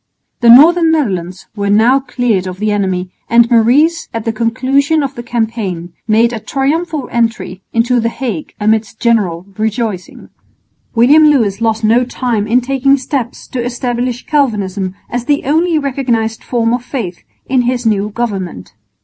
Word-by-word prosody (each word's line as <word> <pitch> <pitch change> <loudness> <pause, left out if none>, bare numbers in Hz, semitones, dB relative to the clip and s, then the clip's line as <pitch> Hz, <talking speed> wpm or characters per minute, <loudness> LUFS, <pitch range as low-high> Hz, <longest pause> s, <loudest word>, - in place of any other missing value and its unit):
The 235 - +4
northern 325 +7 +7
Netherlands 190 - -2
were 200 -1 -2
now 225 +6 +4
cleared 245 -7 -1
of 185 0 -6
the 210 +2 -1
enemy, 185 -3 -1 0.2
and 235 0 +5
Maurice 270 +9 +3
at 225 -1 -5
the 225 - -1
conclusion 265 +7 +1
of 275 -1 -3
the 240 - -7
campaign 220 -7 -3
made 230 +2 +3
a 225 - -4
triumphal 285 +5 -2
entry 230 -5 -2
into 240 +2 +1
the 230 0 0
Hague 230 - -5
amidst 220 +1 0
general 195 -8 0
rejoicing. 220 -3 -3 0.7
William 290 +7 +6
Lewis 225 -8 +1
lost 225 -1 0
no 230 +3 +3
time 240 -4 -2
in 245 +3 +3
taking 275 +2 +2
steps 260 -2 -4
to 245 -2 -3
establish 245 0 -3
Calvinism 200 -9 -1
as 245 0 -4
the 290 +1 +1
only 320 +4 +2
recognised 245 -6 -1
form 235 -2 0
of 245 0 -2
faith 225 -10 -5 0.2
in 260 -1 +1
his 245 0 -1
new 210 -2 +1
government. 195 - -5
235 Hz, 155 wpm, -14 LUFS, 215-260 Hz, 0.7 s, northern